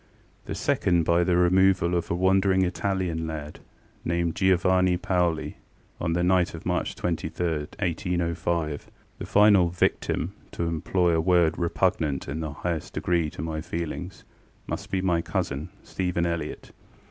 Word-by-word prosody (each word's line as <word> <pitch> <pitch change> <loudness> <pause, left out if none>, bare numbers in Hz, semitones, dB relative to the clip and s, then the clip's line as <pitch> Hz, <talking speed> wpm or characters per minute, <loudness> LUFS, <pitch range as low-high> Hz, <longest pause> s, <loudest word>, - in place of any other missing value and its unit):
The - - -4
second, 85 -2 +1
by 85 +2 +3
the 90 0 +2
removal 90 0 +4
of 85 -1 -1
a - - 0
wandering 95 +1 +3
Italian 90 -3 -1
lad, 75 -1 -6 0.4
named 85 -1 0
Giovanni 95 -1 +3
Paoli, 90 -3 0 0.4
on 85 -1 -1
the 85 +1 +1
night 90 -1 +2
of 80 - -10
March - - -1
23, 85 0 -2 0.3
1805. 85 -4 -1 0.3
The - - -5
final 100 -4 +5
ŌĆśvictimŌĆÖŌĆöto 85 -1 -2
employ 85 +2 +1
a 80 - +2
word 85 -2 +3
repugnant 80 -4 0
in 70 +3 -4
the 80 -2 -3
highest 80 +1 -4
degree 85 -3 +1
to 75 - -7
my 80 -1 -3
feelingsŌĆömust 85 +3 -7
be 95 - 0
my 85 -3 +2
cousin, 70 -2 -3
Stephen 90 -2 -1
Elliott. 85 -3 -4
85 Hz, 135 wpm, -26 LUFS, 80-90 Hz, 0.4 s, final